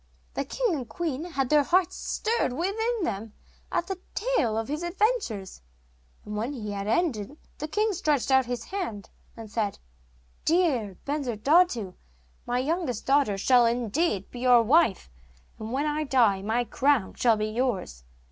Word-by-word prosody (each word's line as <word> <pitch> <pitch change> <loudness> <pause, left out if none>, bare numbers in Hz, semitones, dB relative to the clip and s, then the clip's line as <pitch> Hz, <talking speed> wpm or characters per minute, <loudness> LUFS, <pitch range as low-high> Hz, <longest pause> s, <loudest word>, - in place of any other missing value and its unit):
The - - -2
king - - 0
and 255 -6 -4
queen 310 +3 -3
had 275 -7 -2
their 300 -1 +5
hearts 360 +5 +2
stirred 450 - -1
within 425 - -1
them 215 -7 -3 0.4
at 345 - 0
the 380 0 -5 0.2
tale 410 - +1
of 225 0 -2
his 300 +3 -3
adventures, 345 - -1 0.6
and 210 - -6
when 230 +7 -2
he 215 -6 -5
had 200 0 -4
ended 235 - 0 0.2
the 305 - -3
king 425 +6 +1
stretched 295 -6 0
out 265 -2 +4
his 245 -2 -3
hand, 340 - -5 0.3
and 225 -2 -9
said: 215 -3 -1 0.7
'Dear 275 - +1
Bensurdatu, 275 - +2 0.5
my 245 0 0
youngest 275 - -1
daughter 270 -7 +3
shall 245 +3 +5
indeed 235 - 0
be 245 - -8
your 245 -2 +5
wife; 255 - +3 0.5
and 220 +1 -6
when 275 +4 0
I 300 +1 0
die 235 -9 +3
my 225 +4 0
crown 265 -3 +1
shall 230 -3 +3
be 215 - -1
yours. 215 - -2
255 Hz, 155 wpm, -27 LUFS, 220-335 Hz, 0.7 s, their